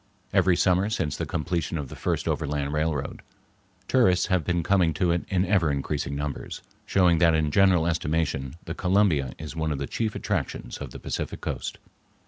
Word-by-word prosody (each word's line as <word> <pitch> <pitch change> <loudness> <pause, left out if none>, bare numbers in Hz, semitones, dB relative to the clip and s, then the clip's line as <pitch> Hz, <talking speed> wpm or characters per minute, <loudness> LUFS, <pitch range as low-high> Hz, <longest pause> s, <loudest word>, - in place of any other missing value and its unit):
Every 90 -2 +4
summer 95 +3 +2
since 85 -9 -1
the - - -3
completion 85 +2 -2
of 70 -4 -5
the - - -8
first - - -2
overland 70 0 -1
railroad, 75 -2 -1 0.7
tourists 105 -9 +4
have 90 -3 +2
been 85 0 0
coming 90 -4 +2
to 85 +1 +2
it 85 0 0
in 95 -1 +2
ever 90 -4 +2
increasing 70 0 -2
numbers, 75 0 -5 0.2
showing 90 -4 +4
that 85 -2 +5
in 75 -2 +1
general 95 -2 +4
estimation 80 -4 -1
the 85 - -4
Columbia 90 -9 +2
is 80 +1 -7
one 80 -1 -1
of 75 - -1
the - - -3
chief 110 -2 -2
attractions 105 - -3
of - - -6
the - - -9
Pacific - - -4
Coast. - - -4
85 Hz, 180 wpm, -26 LUFS, 75-95 Hz, 0.7 s, that